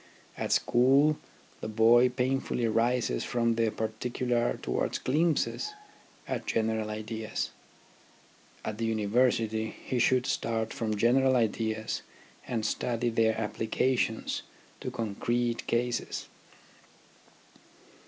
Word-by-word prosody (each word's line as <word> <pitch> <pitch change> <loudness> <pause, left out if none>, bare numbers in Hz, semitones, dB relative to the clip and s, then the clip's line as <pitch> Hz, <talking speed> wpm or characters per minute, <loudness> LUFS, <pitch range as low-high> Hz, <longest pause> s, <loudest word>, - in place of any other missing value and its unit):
At - - -3
school 135 +5 +4 0.4
the - - -5
boy 115 +3 +5
painfully 125 -1 0
rises 115 - +1
from 115 -1 +1
the 115 -1 +2
particu 110 +3 -3
lar 120 0 +2
towards - - -1
glimpses 165 - 0 0.5
at - - -3
general 110 -1 0
ideas; 110 +1 -4 1.1
at 110 0 -4
the 115 - 0
University 110 0 +1
he 125 - -1
should 125 +1 +3
start 115 -1 -1
from 110 -2 -1
general 130 +4 +4
ideas 110 -1 0 0.5
and 115 -3 -1
study 120 +1 0
their 110 -1 +2
applications 115 +2 0 0.4
to - - -4
concrete 120 +2 -1
cases. 120 +1 -1
115 Hz, 105 wpm, -29 LUFS, 110-125 Hz, 1.1 s, boy